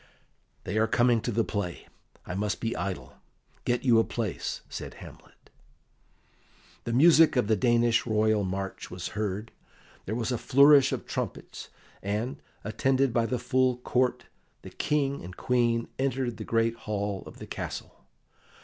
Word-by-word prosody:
"They 105 +4 -1
are 110 - +3
coming 120 -1 +3
to 120 - -2
the 115 +1 +1
play; 100 -6 -4 0.4
I 90 - -5
must 100 +2 -1
be 115 0 -2
idle. 95 0 -5 0.5
Get 120 0 0
you 120 -4 +5
a - - +4
place," 110 -6 -3
said - - -7
Hamlet. - - -15 1.3
The 115 - -2
music 160 +4 +6
of 125 - +3
the 110 +1 +3
Danish 120 +2 +2
royal 110 -1 +2
march 95 +1 -4
was 90 -1 -5
heard, 105 0 -3 0.6
there 110 - -2
was 120 +1 -2
a 120 - -1
flourish 140 0 +6
of - - -3
trumpets, - - -5 0.3
and, 110 +8 -3 0.2
attended 130 +4 +1
by 115 -1 +2
the 125 - -1
full 125 +1 +1
Court, 125 0 0 0.4
the - - -9
King 140 -2 -1
and 90 +1 -9
Queen 120 -2 +1
entered 130 -3 -1
the 110 - -6
great 115 0 +1
hall 100 -2 -2
of - - -11
the - - -8
castle. - - -7
115 Hz, 155 wpm, -28 LUFS, 105-125 Hz, 1.3 s, music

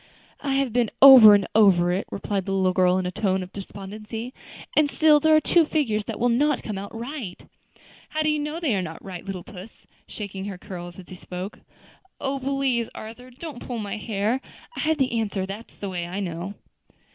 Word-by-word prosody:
"I 275 -2 -1
have 270 -4 0
been 240 -3 +2
over 255 -6 +11
and 200 -2 +1
over 185 -5 +5
it," 185 +3 -2
replied 200 -1 -3
the 195 - -1
little 190 -1 +2
girl 180 0 +3
in 185 - -1
a 180 - -2
tone 190 -2 0
of 180 - -12
despondency, 210 +5 -7 0.4
"and 300 -1 +4
still 305 0 +5
there 315 +1 +4
are - - +7
two 335 +2 +4
figures 240 -10 0
that - - -5
will 245 - +2
not 285 +5 +2
come 210 -3 -4
right." 235 -4 -6 0.7
"How 310 0 -1
do 310 - +2
you 300 0 +1
know 300 +3 -3
they 310 -9 0
are 195 - 0
not 165 -2 -8
right, 185 -3 -7
little 190 -3 -6
puss?" 205 0 -12 0.2
shaking 195 -2 -6
her 200 -2 -5
curls 175 -3 -9
as 190 - -12
he 185 - -8
spoke. 180 +3 -7 0.6
"Oh! 275 0 -2
please, 265 -3 0
Arthur, 230 +4 -9
don't 270 +1 -9
pull 245 - -5
my 210 -1 -4
hair. 215 +4 -1 0.3
I - - -6
have 315 0 +1
the 255 -4 +1
answer 200 -3 -2
that's 200 +4 -9
the 200 - -6
way 175 -2 -4
I 185 +3 -4
know." 180 +1 -4
215 Hz, 205 wpm, -24 LUFS, 190-265 Hz, 0.7 s, over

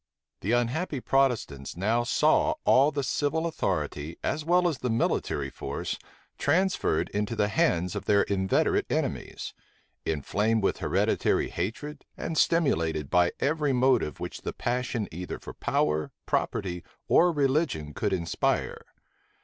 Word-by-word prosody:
The 105 +6 -1
unhappy 130 +6 0
Protestants 120 - 0
now 110 +6 +1
saw 120 - +3
all 135 +3 +6
the 140 -2 -2
civil 150 +4 0
authority, 80 - -2
as 150 - -1
well 175 +2 +3
as 160 -7 -2
the 125 - -2
military 75 -10 0
force, - - -4 0.4
transferred 180 - +1
into 105 +2 -2
the 105 - +2
*hands 90 -2 +1
of - - -4
their 100 -1 +4
inveterate 95 -1 +1
enemies; - - -3 0.5
inflamed 105 +8 0
with - - +1
hereditary - - +1
hatred, 130 - -4
and 165 - -4
stimulated 80 - +1
by 90 -1 +4
every 150 -1 +1
motive 125 - +2
which - - -6
the - - -4
passion 120 -2 -2
either 90 +2 -5
for - - -10
power, 75 0 0 0.2
property, 90 -2 -1 0.2
or 175 +1 +5
religion 135 - 0
could - - -1
inspire. 85 -3 -1
115 Hz, 135 wpm, -27 LUFS, 90-145 Hz, 0.5 s, all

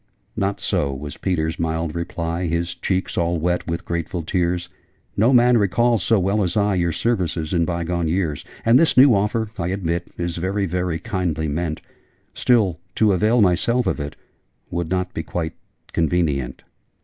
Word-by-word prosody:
'Not 100 0 -1
so,' 70 -1 0
was 70 +1 -6
Peter's 80 -3 -1
mild 80 -1 -1
reply, 85 0 -3
His 85 +1 -1
cheeks 95 +2 -2
all 85 0 +1
wet 90 +2 -1
with 85 +2 -3
grateful 85 0 -3
tears; 90 0 0 0.5
No 110 +5 +4
man 125 -1 +5
recalls, 115 +2 +2
so 110 +4 +3
well 100 +3 +1
as 90 0 0
I, 105 -1 +2
Your 85 -2 +1
services 85 -5 -1
in 85 -2 +2
bygone 85 -1 -1
years: 80 -4 -1 0.2
And 115 +3 +6
this 165 -3 +3
new 130 -1 +8
offer, 105 +2 0
I 85 - -1
admit, 90 -2 -2
Is 85 -1 -3
very 95 +3 -1
very 90 -2 -1
kindly 80 -2 -2
meant 80 +1 -2 0.5
Still, 105 -9 +2 0.2
to 105 -3 +4
avail 110 +6 +3
myself 105 +6 +2
of - - 0
it 75 0 -5 0.6
Would 85 -1 -2
not 90 0 -1
be - - -2
quite 80 0 -3 0.4
convenient!' 75 -6 0
90 Hz, 165 wpm, -22 LUFS, 85-100 Hz, 0.6 s, new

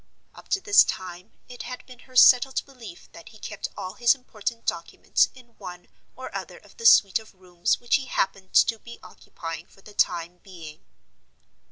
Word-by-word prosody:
Up - - -15
to 390 - +1
this 405 +1 +6
time 180 -1 -7
it 245 -2 -10
had 250 +3 -8
been 250 -2 -15
her 255 - -17
settled 255 +1 +6
belief 240 -10 -13
that 170 - -13
he 220 - -16
kept - - -6
all 185 - -6
his 240 +3 +3
important 230 -2 -6
documents - - 0
in 255 -2 -17
one 180 -3 -10 0.3
or - - -9
other - - -6
of - - -20
the 465 - +3
suite 195 - +6
of 220 -2 -17
rooms 180 -2 -1
which 240 +3 +2
he 265 -2 -8
happened 195 -4 -2
to 225 -2 +4
be 235 +1 -12
occupying 165 0 -9
for 195 - -22
the 210 - -14
time 175 -2 0
being. 165 -5 -12
215 Hz, 185 wpm, -25 LUFS, 180-250 Hz, 0.3 s, this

